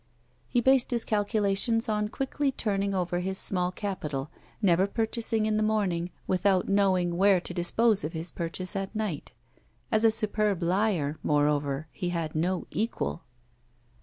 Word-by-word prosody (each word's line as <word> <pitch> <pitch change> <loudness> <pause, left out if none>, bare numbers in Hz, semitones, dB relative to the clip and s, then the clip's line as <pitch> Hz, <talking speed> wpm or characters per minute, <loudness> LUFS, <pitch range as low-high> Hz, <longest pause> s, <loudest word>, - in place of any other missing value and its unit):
He 245 - +2
based 260 0 +4
his 240 -2 0
calculations 210 +2 +1
on 210 -1 0
quickly 270 +4 -1
turning 200 -5 -1
over 175 -1 -1
his 190 +1 -2
small 180 -2 +2
capital, 155 -8 -4 0.3
never 185 -2 +3
purchasing 225 0 -1
in 215 0 +1
the - - +1
morning 200 -6 0 0.2
without 185 0 +2
knowing 185 -3 +2
where 195 0 +5
to 175 - -7
dispose 205 +4 +2
of 155 - -4
his 160 +1 -4
purchase 180 +3 -4
at 195 +2 -4
night. 210 -8 -3 0.6
As 220 0 +3
a 225 - +7
superb 215 -4 0
liar, 175 -5 0
moreover, 145 0 +1
he 180 -3 -3
had 165 -3 -3
no 175 +3 -1
equal. 220 -5 -2
195 Hz, 150 wpm, -28 LUFS, 175-215 Hz, 0.6 s, a